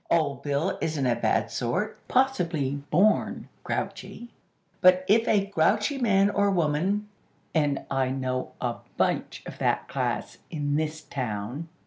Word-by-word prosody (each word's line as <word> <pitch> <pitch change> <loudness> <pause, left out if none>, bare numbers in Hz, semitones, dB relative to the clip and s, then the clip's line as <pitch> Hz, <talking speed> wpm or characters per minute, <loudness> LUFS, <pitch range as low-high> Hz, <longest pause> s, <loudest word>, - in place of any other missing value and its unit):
Old 140 -5 +1
Bill 145 +6 -1
isn't 155 -4 -1
a 120 -2 +3
bad 115 -2 +1
sort; 180 - -1
possibly 175 - +1 0.2
born 200 +7 +2
grouchy; 240 - -4 0.5
but 185 0 +6
if 225 +3 +4
a 200 -2 +3
grouchy 200 - +1
man 200 -4 +3
or 200 0 +2
woman, 185 +4 +1 0.5
(and 145 -3 +1
I 135 -1 +1
know 130 -1 -2
a 120 -2 -2 0.2
bunch - - 0
of - - -9
that - - +1
class - - -3
in 145 -2 -1
this 155 0 -1
town!) 125 +4 -4
155 Hz, 135 wpm, -27 LUFS, 135-200 Hz, 0.5 s, but